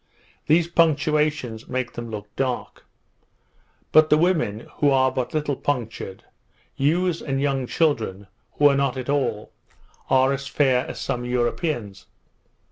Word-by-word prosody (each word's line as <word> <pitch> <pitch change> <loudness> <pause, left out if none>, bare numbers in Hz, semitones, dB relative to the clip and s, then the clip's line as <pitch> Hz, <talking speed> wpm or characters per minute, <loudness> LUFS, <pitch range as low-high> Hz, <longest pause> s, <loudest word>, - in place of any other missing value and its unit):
These 160 +2 +4
puncturations 150 -7 +1
make 130 -1 -2
them 120 -1 -6
look 105 -1 -8
dark: 130 -2 -3 1.1
But 155 0 +6
the 150 - +5
women, 155 - +1 0.2
who 145 - +3
are 130 -1 +3
but 130 -1 -3
little 150 -2 0
punctured, 115 -8 -4 0.5
youths 170 +4 +1
and 135 -2 -2
young 135 -2 0
children, 115 - 0 0.3
who 145 - +5
are 140 - +4
not 140 -2 0
at 130 +1 -5
all, 125 -7 -1 0.6
are 130 +1 +4
as 140 0 -4
fair 130 -3 +2
as - - -7
some 120 - -3
Europeans. 120 - -2
135 Hz, 135 wpm, -23 LUFS, 120-150 Hz, 1.1 s, But